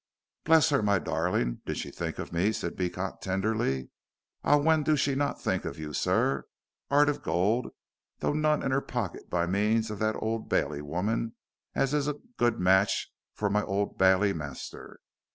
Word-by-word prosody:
"Bless 160 0 +6
her, 140 - +3
my 100 -1 +3
darling. 80 -8 -1
Did - - -2
she - - -4
think - - -4
of - - -6
me," 90 +6 +2
said 85 - -4
Beecot, 90 +1 -3
tenderly. 95 - -1 0.5
"Ah, 145 - +5
when 155 +2 +3
do 155 +1 +2
she 140 +1 +1
not 140 +1 -1
think - - -1
of - - -5
you, 75 -1 -6
sir? 70 -3 +1 0.5
'Eart 145 +1 +5
of 145 - 0
gold, 100 +9 +1 0.5
though - - 0
none 155 0 +2
in 135 - 0
her 135 +1 +2
pocket - - -4
by 85 -1 +1
means 105 +4 +1
of 105 - -6
that 110 0 +1
Old 110 0 -3
Bailey 70 0 0
woman 100 +10 -2 0.4
as 135 +1 +1
is 145 -1 +1
a 150 - 0 0.2
good 120 -1 +2
match 95 +2 +3 0.2
fur 105 - 0
my 105 +1 +3
Old 100 +1 -2
Bailey 95 +1 +4
master. 70 -5 -8
105 Hz, 180 wpm, -29 LUFS, 90-135 Hz, 0.5 s, Bless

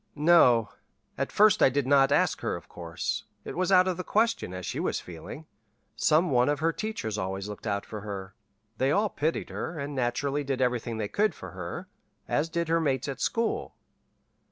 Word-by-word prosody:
"No. 145 -8 +5 0.5
At - - -2
first 210 -1 +5
I - - +7
did 140 0 0
not 135 0 +4
ask - - +2
her, - - -1
of - - -10
course. 85 -1 -4 0.2
It - - -6
was 185 +2 0
out 185 -1 +6
of 185 -2 -1
the 185 - -3
question, 225 - +1
as 90 -1 -6
she - - -3
was - - -1
feeling. 90 - -9 0.5
Some 160 +2 +3
one 125 +1 +3
of 145 -1 0
her 165 +1 +1
teachers 110 - -3
always 95 +1 -3
looked 105 +2 -7
out 100 -1 -1
for 105 -2 -7
her. 100 -2 -6 0.5
They 130 - +2
all 205 +8 +2
pitied 160 0 -2
her, 160 - -4
and 145 0 -4
naturally 135 +3 -1
did 135 -2 -2
everything 125 -2 0
they 105 -2 -2
could 205 - +1
for - - -9
her, 90 -2 -6 0.4
as 155 +3 0
did 170 0 -1
her 165 +1 +2
mates 135 -5 0
at 135 -1 -5
school. 230 -1 -1
140 Hz, 200 wpm, -28 LUFS, 110-165 Hz, 0.5 s, I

